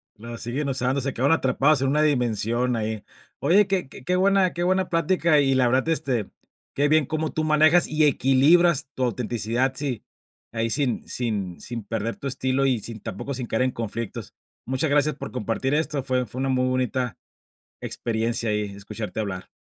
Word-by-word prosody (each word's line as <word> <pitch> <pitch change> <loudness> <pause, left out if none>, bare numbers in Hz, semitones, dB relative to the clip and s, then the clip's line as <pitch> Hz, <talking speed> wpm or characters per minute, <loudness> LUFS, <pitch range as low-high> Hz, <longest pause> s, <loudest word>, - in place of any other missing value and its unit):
La 115 +2 -8
siguen 130 +6 -3
usando, 130 +1 0
se 135 0 -2
quedaron 135 +6 +2
atrapados 135 +1 +2
en 135 - +1
una 150 +2 +2
dimensión 120 -3 +1
ahí. 110 -1 -3 0.4
Oye, 190 +8 +4
que 190 -7 -1
que 140 +7 -3
buena 190 0 +3
que 175 - -2
buena 185 0 +1
plática 165 -2 +2
y 135 -1 +3
la 130 -2 +3
verdad, 130 +5 +1
este, 130 -9 -1 0.4
qué 145 +1 +2
bien 155 0 +3
cómo 155 +3 -2
tú 155 - -2
manejas, 155 +2 +4
y 155 0 +2
equilibras 145 +4 +4
tu 130 - -1
autenticidad, 120 +1 -1
si 130 -5 -3 0.5
ahí, 115 0 -1
sin 135 -3 0
sin 105 -7 -3
sin 120 -3 -6
perder 115 +2 -3
tu 140 - -6
estilo, 130 +1 0
y 130 -4 +2
sin 110 +1 -7
tampoco 135 +10 -5
sin 125 -2 -3
caer 110 - -1
en 130 - +1
conflictos. 115 -1 -5 0.3
Muchas 130 +4 -1
gracias 145 0 +2
por - - -7
compartir 125 +3 -2
esto, 150 -2 0
fue 130 -1 0
fue 120 +3 -8
una 135 0 0
muy 130 -1 +1
bonita 130 -1 -1 0.7
experiencia 115 0 -2
ahí 105 0 0
escucharte 105 +2 -6
hablar. 95 -3 -4
130 Hz, 180 wpm, -24 LUFS, 115-150 Hz, 0.7 s, Oye